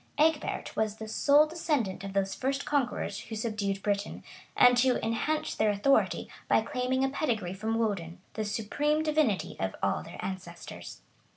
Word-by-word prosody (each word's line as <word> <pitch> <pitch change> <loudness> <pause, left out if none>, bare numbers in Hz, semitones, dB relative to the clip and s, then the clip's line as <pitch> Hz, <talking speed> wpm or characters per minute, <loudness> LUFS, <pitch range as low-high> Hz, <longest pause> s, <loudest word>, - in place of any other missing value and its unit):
Egbert 310 0 +1
was 215 -1 0
the 220 0 -7
sole 285 +7 +5
descendant 295 - -1
of 195 -1 -6
those 195 -1 0
first 270 +1 -2
conquerors 250 -7 -1
who 225 - -6
subdued 210 -3 -2
Britain, 205 0 -2 0.3
and 245 0 +7
who 255 0 +4
enhanced 230 +8 -1
their 215 0 +4
authority 205 +7 +2 0.2
by - - +5
claiming 260 -1 -1
a 270 - +2
pedigree 225 - -1
from 220 +3 -2
Woden, 190 -6 -2
the 220 - -2
supreme 285 +9 0
divinity 300 -10 +1
of 95 0 -2 0.3
their - - -10
ancestors. 185 -2 -7
225 Hz, 155 wpm, -29 LUFS, 200-275 Hz, 0.3 s, and